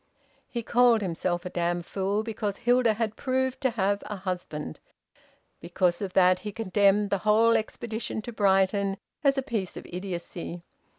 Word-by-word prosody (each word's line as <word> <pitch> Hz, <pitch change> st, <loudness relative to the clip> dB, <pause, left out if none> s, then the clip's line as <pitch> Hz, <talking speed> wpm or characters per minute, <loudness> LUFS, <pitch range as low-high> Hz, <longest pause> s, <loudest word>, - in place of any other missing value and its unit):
He 235 Hz, -2 st, -4 dB
called 240 Hz, -1 st, +4 dB
himself 175 Hz, -1 st, -2 dB
a -, -, -3 dB
damned 175 Hz, 0 st, -1 dB
fool 200 Hz, +3 st, -1 dB
because 210 Hz, -3 st, -3 dB
Hilda 240 Hz, -2 st, +3 dB
had 220 Hz, -1 st, -2 dB
proved 260 Hz, +1 st, -1 dB
to 260 Hz, -, +3 dB
have 200 Hz, -3 st, 0 dB
a 210 Hz, -, -4 dB
husband; 180 Hz, -, -5 dB, 0.8 s
because 175 Hz, 0 st, 0 dB
of 190 Hz, -2 st, -4 dB
that 185 Hz, -1 st, +5 dB
he 210 Hz, +2 st, -5 dB
condemned 205 Hz, -1 st, +2 dB
the 200 Hz, -, +1 dB
whole 220 Hz, +3 st, +4 dB
expedition 220 Hz, 0 st, -3 dB
to 240 Hz, -, -7 dB
Brighton 195 Hz, -1 st, +2 dB, 0.3 s
as 275 Hz, -1 st, +3 dB
a 270 Hz, -, 0 dB
piece 220 Hz, -9 st, -3 dB
of -, -, -8 dB
idiocy. 175 Hz, -1 st, -6 dB
205 Hz, 160 wpm, -27 LUFS, 185-230 Hz, 0.8 s, that